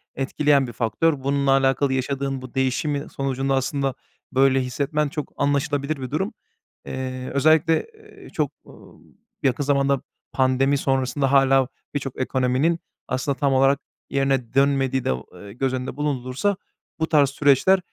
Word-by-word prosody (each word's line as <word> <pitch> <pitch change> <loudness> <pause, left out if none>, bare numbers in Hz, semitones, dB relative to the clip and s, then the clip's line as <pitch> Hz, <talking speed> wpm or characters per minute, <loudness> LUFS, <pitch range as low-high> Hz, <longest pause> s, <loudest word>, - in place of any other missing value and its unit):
etkileyen 140 0 +2
bir 120 - -8
faktör. 135 +5 0
Bununla 140 0 +1
alakalı 135 0 +2
yaşadığın 135 0 -2
bu 130 - -10
değişimin 135 +3 0
sonucunda 135 0 -1
aslında 135 0 -1 0.4
böyle 135 0 +4
hissetmen 145 +4 -1
çok 150 -1 -6
anlaşılabilir 145 0 0
bir 130 - -5
durum. 190 - -1 0.5
Eee, 130 -1 -5
özellikle, 155 +3 +3
eee, 435 -1 -16
çok, - - -1
ımm, - - -17 0.4
yakın 135 +2 +1
zamanda 140 -1 +2 0.3
pandemi 135 +1 +2
sonrasında 135 +1 0
hâlâ 135 -1 +4 0.3
birçok 135 -2 -4
ekonominin 130 +6 +1 0.3
aslında 135 +2 -1
tam 140 0 +1
olarak 135 +1 +4 0.3
yerine 135 -3 0
dönmediği 135 -1 +2
de, 65 - +2
o 65 - -7
eee, 100 0 -11
göz 130 +1 -1
önünde 130 +2 -4
bulundurulursa 145 +6 -1 0.4
bu 160 - 0
tarz 145 -4 +4
süreçler 145 +7 +4
135 Hz, 140 wpm, -23 LUFS, 130-145 Hz, 0.5 s, böyle